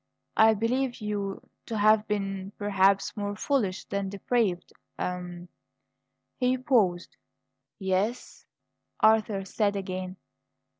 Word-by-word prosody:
I 220 0 +6
believe 245 +4 0
you 205 -2 -4 0.2
to 225 - -3
have 215 +1 +4
been, 195 -1 -3
perhaps, 195 -1 +2
more 205 -1 -3
foolish 210 -5 -1
than 200 -1 -3
depraved 200 -2 -1 0.2
a 180 -1 -4 0.4
" - - -54
He 255 0 +2
paused. 215 -9 +1 0.6
"Yes?" 195 +5 -2 0.5
Arthur 215 -3 +3
said 205 +1 0
again. 185 -1 -4
205 Hz, 105 wpm, -28 LUFS, 190-220 Hz, 0.6 s, I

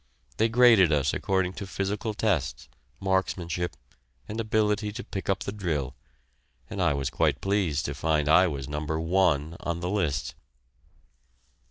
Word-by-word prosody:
They 110 +1 +3
graded 115 -7 +6
us 75 -2 +2
according 95 -1 0
to 100 - -5
physical 105 +3 -3
tests, 75 - -1 0.3
marksmanship, 90 -2 -1 0.5
and 110 +2 -3
ability 105 -1 +1
to 125 +3 -6
pick 95 -1 -6
up 95 0 +1
the - - -3
drill, 80 -10 -3 0.8
and - - -3
I 70 - +2
was 70 -2 -2
quite - - +1
pleased 95 -7 0
to 70 - -2
find 75 +1 0
I 90 +4 +6
was 70 -5 -4
Number 75 +2 -3
"One" 80 -3 +1
on 85 0 -3
the 90 +2 -3
list. 80 -11 -1
90 Hz, 150 wpm, -27 LUFS, 75-100 Hz, 0.8 s, graded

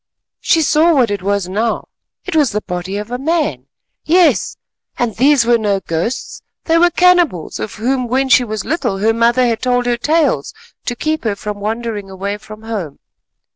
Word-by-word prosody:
She 325 - +2
saw 315 +3 +3
what 245 -6 +3
it 200 -2 -2
was 200 -1 -1
now—it 220 - -4
was 295 -5 +4
the 210 - -1
body 180 +1 -4
of 210 +3 -6
a 245 - -3
man. 275 - -1 0.4
Yes, 350 +2 +2 0.4
and 235 -3 -1
these 270 0 +4
were 235 0 +3
no 205 -2 0
ghosts; 175 +7 -4 0.2
they 330 0 +2
were 350 +1 +5
cannibals 350 - +2
of 215 - -5
whom 250 +3 -1
when 265 +3 +1
she 260 -1 +5
was 215 -4 -4
little, 310 - -1
her 220 +3 +2
mother 235 +2 +3
had 230 -2 0
told 245 -1 +1
her 240 -1 +1
tales 290 - 0 0.3
to 245 - -1
keep 310 +5 -2
her 215 -3 -1
from 205 0 -6
wandering 215 -1 -4
away 200 +2 -4
from 215 +1 -12
home. 205 -10 -5
230 Hz, 180 wpm, -16 LUFS, 205-270 Hz, 0.4 s, were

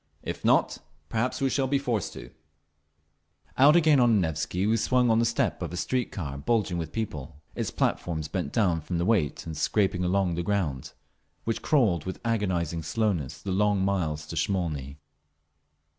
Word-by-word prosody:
If - - -5
not, - - +3 0.3
perhaps 115 +4 -1
we 135 - +2
shall 135 -2 +1
be 140 +1 +2
forced 120 -8 -2
to…." - - -10 1.2
Out 145 +4 +6
again 155 -4 +5
on 120 -2 +5
the - - +4
Nevsky 80 +2 -1
we 110 +2 +3
swung 125 +1 +2
on 110 - +4
the 115 - +3
step 115 0 0
of - - -4
a 90 - -5
streetcar 90 - -2
bulging 100 -1 0
with 80 -2 -5
people, 75 -9 -5
its - - -2
platforms 80 -3 -1
bent 90 +1 -3
down 90 -8 +1
from 85 +3 -3
the 85 - 0
weight 95 -9 +1
and 80 -1 -5
scraping 95 +3 +1
along 90 0 +1
the 85 - -2
ground, 85 -9 -2 0.5
which 115 - -2
crawled 105 - +2
with 95 - -5
agonising 90 -8 0
slowness 85 - -2
the 100 - -3
long 100 0 +2
miles 80 -6 -1
to 75 - -7
Smolny. 80 -6 -2
95 Hz, 175 wpm, -27 LUFS, 80-115 Hz, 1.2 s, Out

